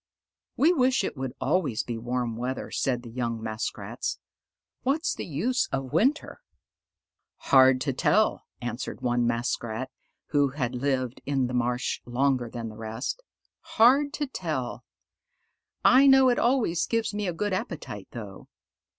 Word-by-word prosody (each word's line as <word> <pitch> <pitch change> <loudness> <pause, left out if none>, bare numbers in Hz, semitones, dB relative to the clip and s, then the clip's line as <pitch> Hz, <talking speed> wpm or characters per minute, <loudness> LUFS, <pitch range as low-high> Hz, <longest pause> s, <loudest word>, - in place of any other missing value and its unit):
"We 320 +6 +5
wish 260 - +2
it - - -3
would 130 -2 -4
always 150 -12 0
be 115 -2 -5
warm 120 0 -2
weather," 125 +3 -4
said 125 -2 -1
the 120 - -10
young 115 -1 -2
Muskrats. 110 -1 -4 0.6
"What's 300 +7 0
the - - -6
use 220 - 0
of 135 0 -3
winter?" 270 - +1 1.0
"Hard 130 -1 +5
to 135 -1 0
tell," 215 - +2 0.2
answered 120 +2 -5
one 120 -1 +1
Muskrat, 120 +1 -2 0.4
who 145 -2 +3
had 130 -3 -3
lived 130 -1 -1
in 135 -2 +1
the 125 - -4
marsh 125 +1 -1
longer 125 0 0
than 115 -1 -5
the 110 - -11
rest. 115 - -4 0.6
"Hard 275 +6 +6
to 300 - -1
tell: 265 - -4 1.0
I 270 +2 +7
know 265 -1 +7
it 245 - +2
always 235 -9 +2
gives 230 -2 0
me 205 -1 -2
a - - 0
good 205 +4 -2
appetite, 150 - -5
though." 105 -5 -9
130 Hz, 145 wpm, -27 LUFS, -, 1.0 s, I